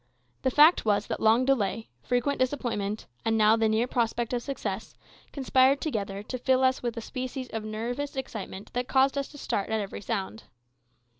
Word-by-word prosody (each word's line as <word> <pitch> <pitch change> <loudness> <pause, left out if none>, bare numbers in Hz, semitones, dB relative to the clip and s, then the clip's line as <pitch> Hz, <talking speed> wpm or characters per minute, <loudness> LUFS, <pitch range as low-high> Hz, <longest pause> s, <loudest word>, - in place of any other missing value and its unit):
The 260 - +2
fact 300 +6 +6
was 205 -1 +2
that - - -4
long 225 +3 +4
delay, 225 -4 0
frequent 250 +3 0
disappointment, 235 -6 -1 0.2
and 225 0 +1
now 215 0 +5
the 225 -1 +2
near 220 +2 +2
prospect 240 -1 -1
of 245 - 0
success, 235 -6 -5 0.4
conspired 265 0 +3
together 200 -8 -3
to 255 +4 -5
fill 260 +1 +2
us 260 0 +2
with 240 -1 -3
a - - -3
species 255 +1 -5
of 225 -1 -4
nervous 240 +7 -4
excitement 215 -7 -6
that 245 +1 -2
caused 270 +1 +3
us 280 -1 -1
to 295 - -13
start 200 -7 -2
at 220 0 0
every 200 -1 -5
sound. 200 +2 -4
240 Hz, 180 wpm, -28 LUFS, 215-265 Hz, 0.4 s, fact